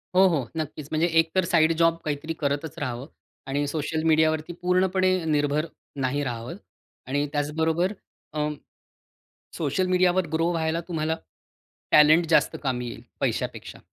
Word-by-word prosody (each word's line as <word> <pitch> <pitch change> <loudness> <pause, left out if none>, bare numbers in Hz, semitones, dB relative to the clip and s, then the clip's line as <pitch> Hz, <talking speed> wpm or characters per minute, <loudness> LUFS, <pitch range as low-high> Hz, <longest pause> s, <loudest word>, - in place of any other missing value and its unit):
हो, 190 +1 +7
हो, 150 -9 0
नक्कीच, 155 -2 -4
म्हणजे 160 +2 +2
एकतर 165 +2 +2
साइड 165 -1 +4
जॉब 165 0 +3
काहीतरी 155 +2 -2
करतच 145 +1 -2
राहावं 130 -1 -4 0.4
आणि 145 +2 0
सोशल 155 +1 -2
मीडियावरती 160 +1 +2
पूर्णपणे 185 0 +2
निर्भर 150 0 +1 0.3
नाही 140 +2 -1
राहावं. 120 +3 -4 0.5
आणि 145 +2 0
त्याचबरोबर, 160 +5 0 0.4
अं, 150 0 -1 1.0
सोशल 165 +4 0
मीडियावर 185 -1 +3
ग्रो 165 +2 +1
व्हायला 165 0 0
तुम्हाला 160 -2 -1 0.7
टॅलेंट 155 +3 +6
जास्त - - +3
कामी 125 -3 -1
येईल, - - -8 0.2
पैशापेक्षा. - - -3
155 Hz, 130 wpm, -25 LUFS, 145-170 Hz, 1.0 s, हो